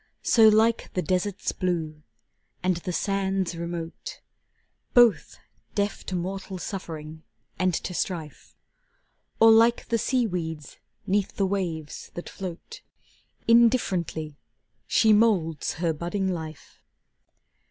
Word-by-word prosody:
So 225 -2 +6
like 220 +2 +3
the 180 - 0
desert's 185 +1 -1
Blue, 160 -5 -2 0.6
and 180 -1 +1
the 175 +1 -4
sands 195 -1 -1
remote, 170 - -6 0.8
Both, 240 -3 +4 0.4
deaf 205 0 -1
to 185 - -3
mortal 190 +2 -4
suffering 160 -5 -7 0.4
and 185 0 +2
to 180 - -4
strife, 165 -4 -5 0.8
Or 225 0 +8
like 230 +1 +4
the 230 - +1
sea 250 +2 +1
weeds 160 -7 -5 0.3
'neath 200 0 0
the 195 - +1
waves 175 -6 -3
that 175 - -6
float, 195 - -8 0.7
Indifferently 190 - +2 0.5
she 220 -1 +4
moulds 190 -8 +2
her 165 0 -1
budding 175 +5 -2
life. 160 -3 -9
185 Hz, 110 wpm, -26 LUFS, 165-210 Hz, 0.8 s, Or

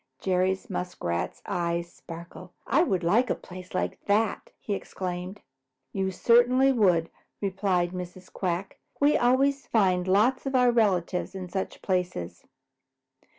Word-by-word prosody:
Jerry 185 0 +1
Muskrat's 90 - -3
eyes 170 0 -2
sparkled. 170 +2 -10 0.2
"I 275 +7 +3
would 190 - +1
like 225 +9 +3
a - - +1
place 180 0 -11
like - - -2
that!" 210 +1 +1
he 205 - -3
exclaimed. 185 0 -5 0.5
"You 190 -1 0
certainly 245 +6 +4
would," 180 -9 +2 0.3
replied 190 -3 0
Mrs. 180 0 -8
Quack. 185 0 -3 0.2
"We 290 +1 +4
always 270 +3 +2
find 185 -5 +2
lots 235 +8 +3
of 270 - -1
your 250 -1 +5
relatives 195 -6 +1
in 185 -1 -6
such 190 +1 -4
places." 175 - -2
190 Hz, 130 wpm, -27 LUFS, 180-230 Hz, 0.5 s, your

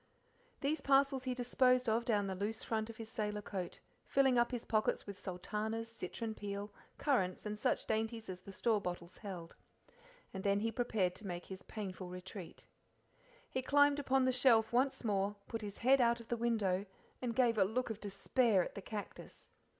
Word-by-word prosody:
These 295 +3 0
parcels 275 -1 +3
he 255 -1 -1
disposed 250 0 +3
of 225 +2 +2
down 210 -4 +2
the 190 - -2
loose 205 +4 -3
front 220 0 -1
of 225 - -9
his 225 - -7
sailor 210 -2 -3
coat, 185 -4 -4 0.2
filling 270 -2 +3
up 240 - +3
his 245 -2 -4
pockets 215 -1 +1
with 200 -1 -8
sultanas, 215 +5 -3
citron 225 +2 -4
peel, 205 0 -5 0.3
currants, 190 -12 +1
and 210 0 -2
such 210 - 0
dainties 225 +1 -1
as 185 -1 -5
the 195 - -11
store 215 +2 +1
bottles 175 -1 -5
held. 180 -6 -7 0.8
And 190 -1 -5
then 200 0 +2
he 225 +1 0
prepared 220 -6 +1
to 210 - -8
make 175 -1 -4
his 190 -1 -8
painful 190 -4 -6
retreat. 180 0 -8 0.8
He 260 - -2
climbed 285 +2 +4
upon 265 -2 +2
the 260 - +4
shelf 235 -3 +4
once 260 +2 +2
more, 205 -2 +1
put 225 -1 -4
his 205 -1 -6
head 260 +2 +5
out 235 0 +3
of 230 - -12
the 240 - +1
window, 210 -5 +1 0.3
and 240 -2 -2
gave 235 -4 +3
a - - +7
look 230 +5 -1
of 215 - -5
despair 205 0 +2
at - - -6
the 200 - -6
cactus. 210 +1 -8
220 Hz, 190 wpm, -36 LUFS, 200-245 Hz, 0.8 s, a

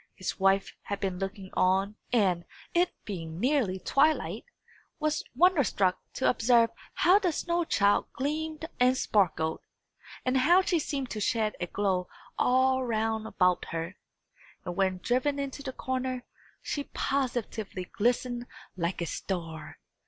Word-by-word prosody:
His 185 - -4
wife 195 0 +3
had 200 - -4
been 185 -2 -2
looking 195 0 -5
on, 190 +3 +2 0.2
and, 190 -8 +2 0.3
it 350 +1 +3
being 165 -5 -5
nearly 245 -6 +2
twilight, 290 - +1 0.5
was 305 0 0
wonderstruck 275 - +3
to 260 - 0
observe 235 -1 +4 0.2
how 370 +4 +5
the 370 -5 +1
snow 345 +2 0
child 205 -8 +3
gleamed 310 +3 -2
and 250 +1 +4
sparkled, 165 -8 +1 0.7
and 255 +1 +2
how 350 +8 +5
she 360 -3 +1
seemed 275 -4 -3
to 215 - -3
shed 215 0 +1
a 175 - -2
glow 185 -2 0 0.3
all 260 +1 +3
round 220 -2 -1
about 180 -4 +2
her; 165 +3 -4 0.7
and 175 - -4
when 190 -1 +1
driven 260 +4 +1
into 280 0 -4
the 275 -2 -4
corner, 255 -1 -3 0.4
she 285 -1 -3
positively 235 -8 -2
glistened 245 +3 0 0.3
like 175 0 -2
a - - 0
star! 165 -2 -5
230 Hz, 135 wpm, -29 LUFS, 190-275 Hz, 0.7 s, how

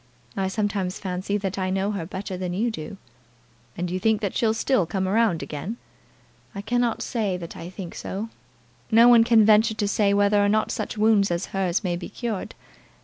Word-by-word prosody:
I 190 -1 0
sometimes 195 -2 -2
fancy 185 +2 -2
that 195 -1 -3
I 185 0 -1
know 195 +2 0
her 185 -6 -4
better 190 -1 -5
than 180 -1 -4
you 230 +5 0
do." 195 0 -7 0.8
"And 175 0 -3
you 185 - -2
think 220 +2 +2
that 200 -3 -2
she'll 220 -1 +2
still 225 -5 +1
come 190 +1 -2
round 210 -4 +2
again?" 180 +10 -5 0.8
"I 200 - -4
cannot 240 0 0
say 210 -6 -1
that 170 -2 -8
I 170 - -8
think 185 -2 -8
so. 210 +4 -5 0.6
No 230 +1 +6
one 240 -2 +7
can 230 -2 +5
venture 220 +1 +4
to 210 -1 -1
say 200 0 +2
whether 205 0 +3
or 205 - +2
not 215 +1 +1
such 215 0 -4
wounds 210 -2 +3
as 170 0 -1
hers 190 0 0
may 175 -2 -1
be 175 - -7
cured. 225 -6 -5
200 Hz, 200 wpm, -24 LUFS, 185-220 Hz, 0.8 s, one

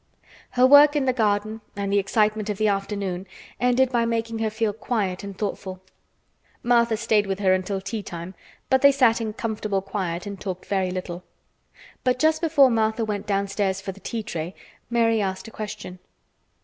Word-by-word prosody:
Her 250 - +7
work 290 +2 +8
in 285 -2 +1
the 255 - +2
garden 215 -1 0
and 200 0 -2
the 200 - +4
excitement 215 +1 +1
of 205 - -2
the 215 0 +2
afternoon 195 -2 -2 0.3
ended 250 +1 +3
by 240 -2 +2
making 230 -1 -2
her 220 -1 0
feel 220 -1 -1
quiet 205 -4 -2
and 200 -2 -7
thoughtful. 195 -2 -4 0.8
Martha 235 -2 +3
stayed 215 -2 +2
with 195 -1 -1
her 190 -2 +3
until 185 +1 -1
tea 210 +3 -4
time, 175 -1 -7 0.3
but 265 0 +3
they 280 - +8
sat 250 -4 +3
in 220 -1 -3
comfortable 215 -3 -2
quiet 190 -3 -3
and 200 -2 -7
talked 185 -2 -5
very 190 -2 0
little. 180 -1 -5 0.8
But 255 -1 +2
just 315 +3 +2
before 290 -6 +5
Martha 220 0 +1
went 205 -2 -4
downstairs 195 -1 0
for 195 0 -5
the 195 - -14
tea 225 +2 -4
tray, 170 -2 -5 0.3
Mary 230 -2 +2
asked 190 +1 -3
a - - -10
question. 210 -4 -7
210 Hz, 180 wpm, -24 LUFS, 195-230 Hz, 0.8 s, work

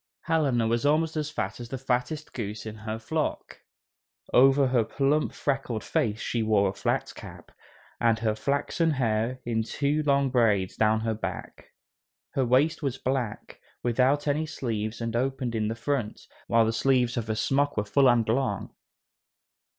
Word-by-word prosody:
Helena 140 -8 +1
was 115 +1 0
almost 155 +2 +2
as 150 -1 -2
fat 110 -8 -4
as 120 -1 -8
the 135 - -4
fattest 130 +4 -2
goose 105 -2 -5
in 110 - -5
her 110 +1 -5
flock. 115 - -3 0.7
Over 135 +2 +6
her 125 -3 +3
plump, 140 +6 0
freckled 135 -6 -2
face 110 -1 0
she 115 - -2
wore 105 -3 +3
a - - -5
flat - - -1
cap, - - -11 0.5
and 115 -1 +3
her 115 -1 0
flaxen 140 +8 0
hair 120 -1 -1
in 115 -1 0
two 145 +6 0
long 140 -2 +2
braids 105 -7 +2
down 110 0 +2
her 115 0 -1
back. 110 - -6 0.6
Her 135 - 0
waist 130 +6 +2
was 135 -3 -2
black, 130 -5 -3 0.2
without 130 +5 +2
any 150 +2 0
sleeves 110 -5 -3
and 115 0 -3
opened 130 -1 -1
in 110 -2 0
the 110 - -2
front, 120 -2 -2 0.3
while 115 -1 +4
the 110 - 0
sleeves 125 +1 +2
of 115 -2 -3
her 110 - -1
smock 140 +6 +1
were 105 - 0
full 135 +6 +4
and 120 -2 +3
long. 115 -3 -1
120 Hz, 165 wpm, -27 LUFS, 110-140 Hz, 0.7 s, Over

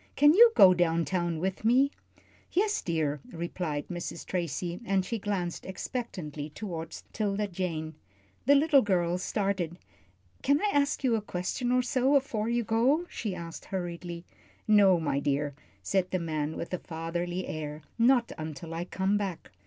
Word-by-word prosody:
Can 295 +1 +6
you 460 +5 +8
go 185 -1 +9
down 170 -2 +2
town 175 -3 -1
with 190 +5 -2
me?" 260 +5 +4 0.6
"Yes, 420 +3 +1
dear," 155 -4 -1
replied 165 -3 -3
Mrs. 175 -1 -5
Tracy, 175 0 -3
and 195 -4 +1
she 225 +4 -3
glanced 190 -4 -2
expectantly 180 - -5
toward 165 -2 -6 0.2
'Tilda 210 -1 -1
Jane. 170 -4 -3 0.5
The 285 - +7
little 285 -1 +5
girl 180 -4 +1
started. 190 -4 -1 0.6
"Can 280 +2 +3
I 420 - +1
ask 285 0 +1
you 245 -3 +3
a 220 - 0
question 205 +6 -2
or 250 0 +3
so 260 +2 +2
afore 230 -5 +1
you 235 0 +1
go?" 245 +10 +2
she 205 -5 -3
asked, 170 -1 -8
hurriedly. 175 -2 -5 0.4
"No, 200 -4 +6
my 145 -3 0
dear," 145 +1 0 0.3
said 185 - +1
the 185 - 0
man, 155 -3 -2
with 170 - -5
a 180 - -1
fatherly 170 +2 -3
air. 150 -1 -5 0.2
"Not 240 0 +4
until 155 +1 -6
I 170 +1 -3
come 190 +2 0
back." 195 -5 -4
185 Hz, 160 wpm, -29 LUFS, 165-230 Hz, 0.6 s, go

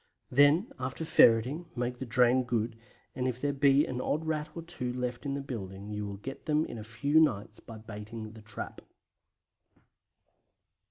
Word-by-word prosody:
Then, 145 - +5
after 130 +5 -3
ferreting, 130 +4 +4
make 125 0 -2
the 130 - -5
drain 125 +2 +4
good, 115 -1 -1 0.4
and 125 0 -1
if 125 -1 -2
there 145 +1 0
be 140 +1 +4
an 125 0 -3
odd 155 +4 -1
Rat 155 -1 -1
or 165 - -5
two 160 -7 -4
left 125 +2 -3
in 140 - -1
the 140 - -3
building 100 -6 -6
you 105 0 -3
will 100 -1 -6
get 135 +10 -8
them 155 +1 +2
in 120 - -7
a - - -7
few 140 +8 +2
nights 110 -8 +1
by 115 - -10
baiting 110 0 -8
the 110 0 -12
trap. 105 -1 -6
125 Hz, 175 wpm, -30 LUFS, 110-145 Hz, 0.4 s, Then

